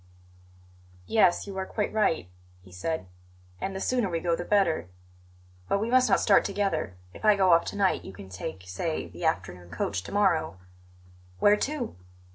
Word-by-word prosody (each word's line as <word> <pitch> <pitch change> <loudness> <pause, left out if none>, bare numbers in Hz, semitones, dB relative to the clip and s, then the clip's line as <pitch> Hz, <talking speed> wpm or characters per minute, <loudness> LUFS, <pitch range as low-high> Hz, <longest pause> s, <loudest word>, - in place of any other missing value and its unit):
"Yes, 185 - +3
you 200 -1 -7
are 190 - -2
quite 210 - -2
right," 210 - +1 0.4
he 90 - -16
said; 125 - -3 0.5
"and 195 - -3
the - - -3
sooner 245 -2 0
we 165 -1 -1
go 170 0 +1
the 175 - -4
better. 175 - +1 0.8
But - - +2
we 225 +3 -2
must 255 -2 +5
not 195 - +4
start - - +5
together. 195 - -1 0.2
If - - -13
I 215 -1 +6
go 190 -2 +4
off 170 - +4
to - - -5
night, 195 -2 +1
you - - -8
can 95 0 -11
take, 95 0 -6
say, 95 - -3
the 175 - -7
afternoon 90 - -2
coach 90 +2 -2
to 95 - -10
morrow." 170 - +1 0.8
"Where 205 - +5
to?" 270 +2 -3
175 Hz, 180 wpm, -27 LUFS, -, 0.8 s, I